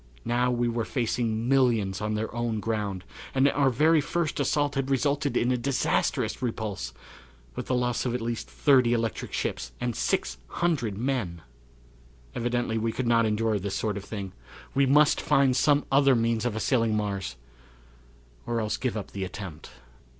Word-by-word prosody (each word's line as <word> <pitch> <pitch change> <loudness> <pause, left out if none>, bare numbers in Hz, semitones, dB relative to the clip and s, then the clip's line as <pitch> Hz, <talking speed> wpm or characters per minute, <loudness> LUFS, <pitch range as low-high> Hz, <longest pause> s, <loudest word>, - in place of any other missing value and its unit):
Now 125 +1 +2
we 120 -1 +1
were 115 0 -1
facing 115 -2 -1
millions 115 -7 +2
on 105 0 -1
their 110 +1 -3
own 120 -2 -1
ground, 105 -4 -2 0.3
and 135 +1 +5
our 140 -1 +3
very 155 +5 +4
first 165 +1 -2
assault 145 +1 +1
had 135 -1 -1
resulted 140 +1 +1
in 120 - +2
a 125 - +2
disastrous 130 +2 0
repulse, 110 - -3 0.6
with - - -5
the 130 - +1
loss 125 -1 0
of 125 -1 -1
at - - -1
least 115 0 -4
thirty 130 -5 +4
electric 115 -1 -2
ships 60 -1 -3
and 120 -2 -2
600 105 - -1
men! 110 -9 -2 0.9
Evidently 120 -1 -1
we 115 +1 0
could 130 +3 -3
not 115 -1 +3
endure 110 0 +1
this 95 0 -3
sort 105 0 -1
of 100 - -5
thing. 100 -2 -6 0.4
We 140 0 +3
must 150 +2 +5
find 135 -2 +3
some 145 +2 +3
other 135 -1 +5
means 115 0 +1
of 120 -3 -1
assailing 115 -1 +1
Mars 100 -3 -3 1.1
or 120 -1 0
else 105 -1 -1
give 125 -3 -2
up 100 -2 -6
the 100 - -4
attempt. 95 -4 -7
120 Hz, 165 wpm, -27 LUFS, 105-130 Hz, 1.1 s, and